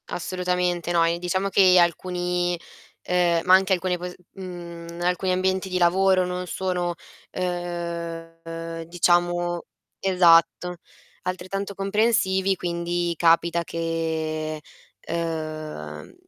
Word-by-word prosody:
Assolutamente 180 -1 -1
no 170 -1 +4
e 170 +1 0
diciamo 185 +2 -1
che 185 -2 +6
alcuni, 175 0 +1 0.4
ehm, 175 -2 +2
ma 185 - +6
anche 190 0 +5
alcune 180 0 0
po 180 +1 -5 0.2
uhm, 170 -2 -8
alcuni 180 +1 +1
ambienti 190 +1 0
di 185 - -1
lavoro 185 +1 +4
non 180 0 -4
sono 180 -2 -2 0.3
ehm, 165 -2 -5
diciamo 175 0 +1 0.4
esatto 180 -1 +4 0.5
altrettanto 195 +2 -4
comprensivi 195 -1 +2
quindi 175 0 -2
capita 170 +1 +3
che, 160 -2 -2 0.4
ehm, 155 - -5
175 Hz, 100 wpm, -24 LUFS, 170-185 Hz, 0.5 s, che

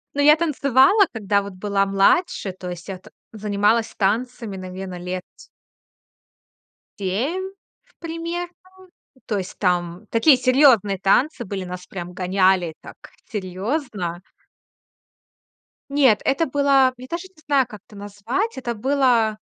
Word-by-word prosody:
Ну, 285 - +1
я 300 +1 +7
танцевала, 300 - +4
когда 205 -2 0
вот 200 0 -8
была 200 +1 0
младше. 195 - +2
То 180 -1 -8
есть 175 -1 -8
я 195 -2 -5
т - - -17 0.2
занималась 215 +1 0
танцами, 220 +1 -1
наверное, 185 0 -7
лет 180 +1 -5 1.8
7 265 - -2 0.4
в - - -32
примерно. 335 +1 -5 0.7
То 210 - -1
есть 185 -1 -6
там 180 +1 -1
такие 260 +5 +5
серьёзные 250 -6 +4
танцы 240 - +2
были, 195 -2 -5
нас 180 0 -8
прям 180 -1 -7
гоняли 185 -2 +1
так - - -12 0.3
серьёзно. 195 - -3 1.7
Нет, 270 -7 +4
это 275 +5 +1
было 275 -2 +3
я 255 +1 -10
даже 340 +2 -5
не 375 -4 -24
знаю, 275 -4 +2
как 210 -4 -11
это 215 - -16
назвать. 205 - -3
Это 245 -2 -3
было. 240 -3 +2
215 Hz, 130 wpm, -22 LUFS, 190-275 Hz, 1.8 s, я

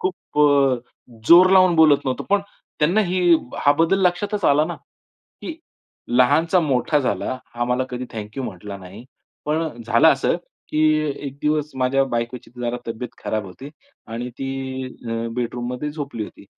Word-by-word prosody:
खूप 185 -4 -4
अ, 140 -3 +4 0.5
जोर 180 +2 +8
लावून 185 -2 +6
बोलत 155 -3 +6
नव्हतो. 130 -1 -2
पण 205 - +4 0.4
त्यांना 170 +8 +3
हे 180 +1 -1 0.4
हा 145 - +6
बदल 185 +4 +3
लक्षातच 200 +2 -1
आला 145 +2 +4
ना, 175 - -4 0.7
की 330 - -6 0.5
लहानचा 160 +9 +3
मोठा 145 0 +1
झाला, 130 -1 -2 0.2
हा 120 0 -1
मला 125 +1 0
कधी 125 0 -4
थँक 105 -2 -7
यू 135 - -2
म्हटला 100 -2 -7
नाही. 100 +4 -12 0.4
पण 150 -5 -2
झालं 115 +6 +4
असं, 135 +2 +2 0.3
की 155 - -1 0.5
एक 140 +1 -8
दिवस 150 0 0
माझ्या 130 +1 +2
बायकोची 120 +1 -3
जरा 120 0 -2
तब्येत 115 +2 -5
खराब 110 -1 -2
होती 130 +10 -10 0.4
आणि 115 +2 -5
ती 135 -1 -4
अ, 115 -2 -5
बेडरूममध्ये 125 +3 -3
झोपली 140 -7 -5
होती. 100 - -14
135 Hz, 155 wpm, -21 LUFS, 120-155 Hz, 0.7 s, जोर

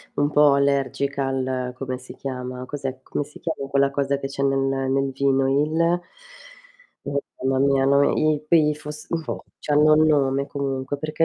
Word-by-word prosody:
un 145 +1 +1
po' 145 -1 +5
allergica 140 0 0
al 130 -1 -2
come 130 -1 -4
si 130 - -12
chiama, 125 -1 -5
cos'è 135 -2 -5
come 145 - -3
si 150 - -15
chiama 140 -4 -4
quella 140 0 +2
cosa 140 0 0
che 135 - -6
c'è 140 0 -5
nel 135 0 +2 0.3
nel 135 0 +1
vino? 135 0 +1
Il 160 +5 +1 1.0
Oh 140 0 -1 0.2
mamma 130 0 +1
mia 135 -1 +3
no 140 +1 +4 0.2
i 155 -1 +1
quei 150 -2 +4
fosf 150 0 -9 0.2
oh, - - -4 0.2
c'hanno 150 +1 +4
nome, 140 -3 +2
comunque 135 0 -3
perché 155 +2 -1
140 Hz, 165 wpm, -23 LUFS, 135-150 Hz, 1.0 s, po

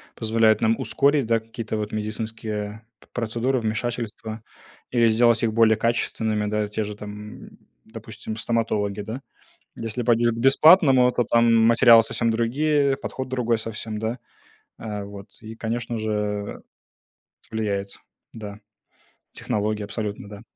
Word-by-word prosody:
позволяют 110 -1 +2
нам 115 +2 +2
ускорить, 140 +3 +2
да, 115 0 +2
какие-то 110 0 -6
вот 105 0 -4
медицинские, 110 +1 -4 0.3
э, - - -38
п - - -22
процедуры, 120 +2 -1
вмешательства 110 0 -4 0.5
или 120 -2 +4
сделать 115 +1 +3
их 110 -2 +1
более 110 -1 +4
качественными, 110 -2 0
да. 105 0 -1
Те 105 +1 -3
же 105 0 -6
там, 105 0 -9 0.4
допустим, 110 -1 -8
стоматологи, 110 -3 -1
да. 110 +6 -6 0.5
Если 115 +2 -4
пойдёшь 120 0 +3
к - - -7
бесплатному, 135 0 +6
да, - - -6
то 120 - +2
там 115 0 +3
материалы 115 0 +7
совсем 115 +1 0
другие, 140 +4 +1
подход 130 -1 -5
другой 120 -3 0
совсем, 110 -1 -6
да. 110 +3 -3 0.6
Э, 105 -2 -5
вот 100 0 -10
и, 110 0 -9
конечно 115 +1 -3
же, 110 0 -2
это 105 -1 -3 0.9
влияет, 100 -3 -3 0.4
да. 105 -2 -9 0.7
Технологии 105 0 -2
абсолютно, 105 0 -5
да. 105 -1 -10
110 Hz, 140 wpm, -24 LUFS, 105-120 Hz, 0.9 s, материалы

